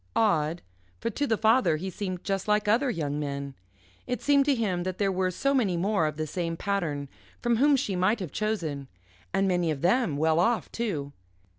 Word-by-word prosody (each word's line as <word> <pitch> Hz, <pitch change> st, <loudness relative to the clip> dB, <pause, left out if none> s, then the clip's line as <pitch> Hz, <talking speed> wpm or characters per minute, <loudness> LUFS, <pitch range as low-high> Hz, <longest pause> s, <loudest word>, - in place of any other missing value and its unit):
Odd, 170 Hz, -7 st, +1 dB, 0.4 s
for 230 Hz, -, -2 dB
to 285 Hz, +3 st, -1 dB
the 225 Hz, -, +1 dB
father 220 Hz, -7 st, +3 dB
he 190 Hz, +4 st, -5 dB
seemed 185 Hz, -2 st, -4 dB
just 195 Hz, 0 st, -2 dB
like 210 Hz, 0 st, +2 dB
other 245 Hz, +6 st, +3 dB
young 150 Hz, -9 st, -2 dB
men. 140 Hz, -1 st, -4 dB, 0.5 s
It 250 Hz, 0 st, -2 dB
seemed 280 Hz, -1 st, +3 dB
to 285 Hz, -1 st, +3 dB
him 200 Hz, -7 st, -1 dB
that 185 Hz, 0 st, -3 dB
there 200 Hz, -2 st, +1 dB
were 185 Hz, 0 st, 0 dB
so 275 Hz, +10 st, 0 dB
many 210 Hz, -10 st, +1 dB
more 190 Hz, -2 st, +1 dB
of 150 Hz, -, -4 dB
the 155 Hz, -, -1 dB
same 165 Hz, +1 st, -3 dB
pattern 165 Hz, -9 st, -2 dB, 0.3 s
from 240 Hz, -1 st, +1 dB
whom 285 Hz, +3 st, +5 dB
she 225 Hz, -8 st, -1 dB
might 190 Hz, +5 st, +2 dB
have 180 Hz, -7 st, -5 dB
chosen. 165 Hz, -11 st, -2 dB, 0.4 s
And 195 Hz, -, +1 dB
many 175 Hz, -3 st, +1 dB
of 145 Hz, -3 st, -2 dB
them 180 Hz, -, +2 dB
well 160 Hz, +2 st, +2 dB
off, 230 Hz, +6 st, +1 dB
too. 155 Hz, -12 st, -3 dB
190 Hz, 200 wpm, -27 LUFS, 160-225 Hz, 0.5 s, whom